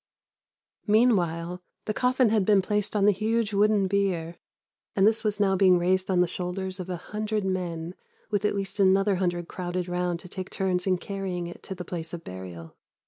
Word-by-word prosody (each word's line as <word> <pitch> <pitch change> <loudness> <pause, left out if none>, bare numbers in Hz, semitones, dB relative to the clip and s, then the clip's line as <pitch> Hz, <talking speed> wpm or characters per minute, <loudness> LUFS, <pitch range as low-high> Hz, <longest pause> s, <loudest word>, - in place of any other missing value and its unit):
"Meanwhile, 180 -6 +2 0.2
the 215 - -1
coffin 250 0 +3
had 215 -2 +3
been 200 -1 +4
placed 210 +1 -1
on 200 -1 +3
the 210 - +7
huge 215 +2 0
wooden 205 0 +3
bier, 185 -4 0 0.6
and 195 - +4
this 220 +1 +3
was 210 -1 -1
now 195 -2 +3
being 185 -1 +5
raised 185 +2 +1
on 180 -2 +3
the 180 - +3
shoulders 185 +2 -4
of 185 0 -6
a 180 - -2
hundred 210 +3 -3
men, 175 -3 -3 0.4
with 205 -1 0
at 210 - +1
least 195 +1 -4
another 195 0 +4
hundred 175 -2 -1
crowded 180 0 -3
round 180 -1 -1
to - - -11
take 185 +1 -6
turns 185 -1 -1
in 185 -1 +3
carrying 185 -2 -4
it 175 - -9
to 190 - -7
the 180 -1 -7
place 165 -1 -5
of 170 - -10
burial. 90 -3 -9
190 Hz, 195 wpm, -27 LUFS, 175-205 Hz, 0.6 s, the